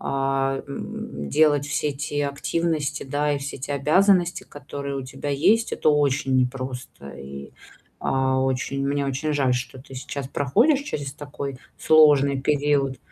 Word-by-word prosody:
а, 135 0 0
м, 70 - -6
делать 145 -2 +3
все 150 0 -1
те 145 +1 -2
активности, 150 +1 -2
да, 145 +2 0
и 145 - -1
все 140 +1 -6
те 140 +2 -3
обязанности, 175 +5 +3
которые 140 -1 -6
у 135 - -4
тебя 130 +3 -5
есть- 200 +11 +2
это - - +1
очень 140 -2 +2
непросто. 125 - -3
И, 70 0 -9 0.5
а, 130 0 +1
очень, 135 +1 -1
мне 140 0 0
очень 140 +3 -1
жаль, 135 -3 +2
что 125 +1 -5
ты 135 0 -13
сейчас 130 +1 -5
проходишь 230 - +2
через 145 - -4
такой 140 -2 -6 0.2
сложный 145 -3 +5
период. 140 -2 +1
140 Hz, 145 wpm, -24 LUFS, 135-150 Hz, 0.5 s, сложный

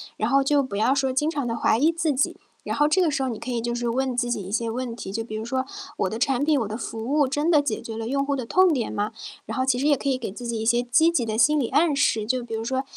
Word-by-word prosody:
然 215 +2 -1
后 275 +1 +4
就 285 +1 +3
不 260 -7 -5
要 220 +6 +3
说 270 -1 +1
经 270 +4 0
常 290 -6 -2
地 230 0 -2
怀 - - +2
疑 315 +4 +4
自 325 -2 0
己， 270 +2 0 0.2
然 - - -4
后 295 0 +4
这 370 +5 +3
个 335 - +3
时 270 -2 -1
候 260 - -1
你 225 - -5
可 245 - -7
以 240 -2 -1
就 235 +1 -2
是 240 0 -2
问 260 +1 -1
自 245 0 0
己 215 -4 -2
一 190 - -8
些 230 +1 -1
问 240 0 -4
题， 190 - -7
就 225 +3 -3
比 215 -1 -7
如 215 - -4
说 260 +3 -2 0.3
我 - - +1
的 220 +4 -4
产 270 +2 +1
品、 300 -3 +3
我 220 - -2
的 215 - -5
服 225 -1 -6
务 285 +3 +2
真 290 +5 0
的 300 -4 +4
解 245 -7 -2
决 225 -1 -7
了 225 0 -4
用 275 +2 0
户 280 0 -1
的 255 -3 -4
痛 370 +6 +4
点 255 -7 -1
吗？ 205 +1 -1 0.4
然 - - -4
后 260 - +1
其 250 -2 +1
实 285 - +1
也 290 - +4
可 280 - -5
以 265 -2 +1
给 225 -6 -5
自 240 +4 -9
己 230 -2 -2
一 - - -2
些 240 +2 +2
积 315 +7 +4
极 265 -8 0
的 215 -1 -2
心 290 +7 +4
理 240 - -1
暗 295 +2 +3
示， 220 -6 +1
就 255 +1 0
比 235 - -8
如 225 0 -2
说， 260 +3 -1
255 Hz, 355 characters per minute, -24 LUFS, 230-285 Hz, 0.4 s, 后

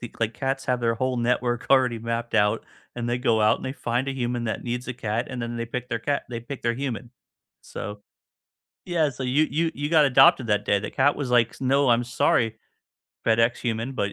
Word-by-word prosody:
the 120 - -7
like 115 0 0
cats 135 0 -2
have 125 -1 0
their 115 -1 +1
whole 130 +2 -1
network 120 0 0
already 130 -4 +4
mapped 115 +1 -3
out 105 0 +2 0.3
and 120 -1 -3
they 120 +1 0
go 115 -3 +2
out 105 0 +4
and - - -11
they 130 - -3
find 125 0 -2
a - - -1
human 120 -2 -2
that 110 - -3
needs 125 +1 -3
a - - -1
cat 115 0 -2
and 125 -2 -5
then 120 0 -4
they 115 0 -3
pick 125 +1 -5
their 115 - -2
cat 140 +5 -1
they 115 -2 -5
pick 135 +3 -8
their 120 0 +1
human. 125 -2 -4 0.5
So 105 0 -7 0.8
Yeah, 165 -4 +1
so 135 0 -7
you 135 +5 +2
you 165 +1 +1
you 145 +1 -3
got 160 -3 +6
adopted 140 +1 +5
that 105 -1 +1
day, 100 - +2
the 100 - -5
cat 140 +2 +2
was 140 -4 -3
like, 120 -2 +2
"No, 135 +1 +2
I'm 120 +1 +3
sorry, 115 -1 +1 0.7
FedEx 115 +1 +3
human, 115 +2 -2
but 100 -7 -2
120 Hz, 225 wpm, -25 LUFS, 115-130 Hz, 0.8 s, got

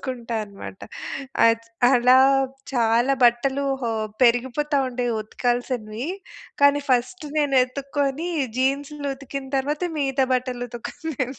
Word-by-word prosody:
చూసుకుంటా 240 -3 -4
అనమాట. 200 -1 -10 0.7
అచ్ 230 0 0 0.2
అలా 250 0 +5 0.6
చాలా 240 +2 +3
బట్టలు 265 +4 +2 0.2
హో 235 - 0 0.3
పెరిగిపోతా 260 +5 +2
ఉండేవి 245 -1 -2
ఉతకాల్సినవి. 240 +1 -2 0.5
కానీ 285 0 +6
ఫస్ట్ 255 +7 0
నేను 290 -2 +1
ఎతుక్కోని 280 +4 -2 0.3
జీన్స్‌లు 280 +2 -1
ఉతికిన 275 0 -7
తర్వాత, 295 +4 -2 0.2
మిగతా 270 -2 +1
బట్టలు 250 -1 -2
ఉతుక్కునే 255 +4 -4
255 Hz, 105 wpm, -23 LUFS, 240-280 Hz, 0.7 s, కానీ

